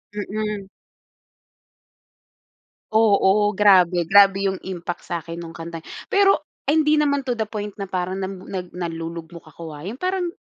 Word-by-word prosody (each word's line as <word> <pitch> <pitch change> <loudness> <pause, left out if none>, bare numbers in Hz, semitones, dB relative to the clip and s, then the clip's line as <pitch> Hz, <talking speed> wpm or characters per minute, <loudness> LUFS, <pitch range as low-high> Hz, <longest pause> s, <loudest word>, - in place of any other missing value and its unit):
Mm. 210 -1 -3 2.2
Oo 210 -1 +4
grabe. 185 -4 +5
Grabe 195 +2 +5
'yung 190 - -4
impact 175 -2 -6
sa 170 -2 -3
akin 165 +1 -7
nung 165 0 -8
kantang 165 -1 -8 0.3
pero 395 -5 +4 0.2
ay, 295 +3 +2
hindi 305 0 +3
naman 285 -2 +1
to 245 - 0
the 225 - 0
point 210 -1 -6
na 195 -2 -7
parang 185 +1 -2
nam 190 0 -5
nag 180 -2 -5
nalulugmok 165 -1 -6
ako, 160 0 -9
ha. 145 - -10
'Yun 215 +8 -6
parang 365 -1 -1
195 Hz, 150 wpm, -22 LUFS, 170-215 Hz, 2.2 s, grabe